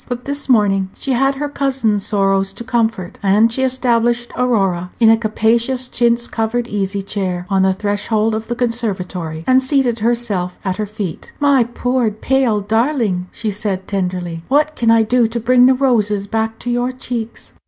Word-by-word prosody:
But 245 0 -5
this 285 0 -3
morning 195 -5 +3
she 270 - -4
had 270 +2 +2
her 295 +2 -3
cousin's 265 -8 0
sorrows 195 -1 +1
to 210 - -8
comfort, 225 -6 -2
and 210 +3 +3
she 260 - -1
established 240 -2 +1
Aurora 195 -8 0
in 225 -2 +6
a - - +6
capacious 230 +3 0
chintz 235 -1 +1
covered 230 +2 -2
easy 200 -1 -2
chair 185 -3 -3
on 195 -1 +3
the 190 0 +3
threshold 210 +2 0
of 220 0 -4
the 240 - -3
conservatory, 190 -9 -3
and 260 0 +4
seated 260 -3 +1
herself 215 -6 -1
at 185 -1 -1
her 215 -1 -3
feet. 205 -5 -6
"My 280 -3 +4
poor, 245 0 -1
pale 225 0 0
darling," 220 -4 0
she 220 -2 -3
said, 195 -2 -3
tenderly, 180 -4 -3
"what 300 +3 +1
can 230 - 0
I 225 0 +5
do 240 +1 +2
to 235 +1 -4
bring 250 +2 +4
the 260 - +4
roses 215 -6 +1
back 225 +1 -2
to 245 - -3
your 245 +1 0
cheeks?" 235 -3 -6
225 Hz, 175 wpm, -17 LUFS, 200-245 Hz, -, in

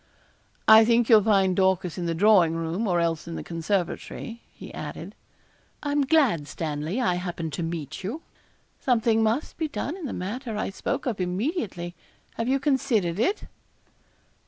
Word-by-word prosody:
'I 220 0 +9
think 235 0 +3
you'll 220 -3 +8
find 195 -3 +3
Dorcas 190 -2 +1
in 175 -2 -3
the 165 - -1
drawing 180 -3 +5
room, 165 +7 -2
or 175 -2 +2
else 165 -1 -1
in 165 - -5
the - - -5
conservatory,' 185 +6 -3
he - - -11
added. - - -7 0.7
'I 290 - -1
am 285 -1 +2
glad, 255 - +3
Stanley, 155 - -3
I 235 -8 +2
happened 170 -3 -4
to 155 - -3
meet 165 -1 -5
you. 250 - -4 0.6
Something 225 -3 +2
must 225 +7 0
be 320 - 0
done 300 +1 -4
in 370 -5 -7
the - - -5
matter 220 +4 -4
I 210 - -2
spoke - - -3
of 225 -7 -2
immediately. 180 - -2 0.4
Have 230 - -3
you 270 +2 +2
considered 255 - +1
it?' 390 - +1
200 Hz, 165 wpm, -26 LUFS, 170-240 Hz, 0.7 s, I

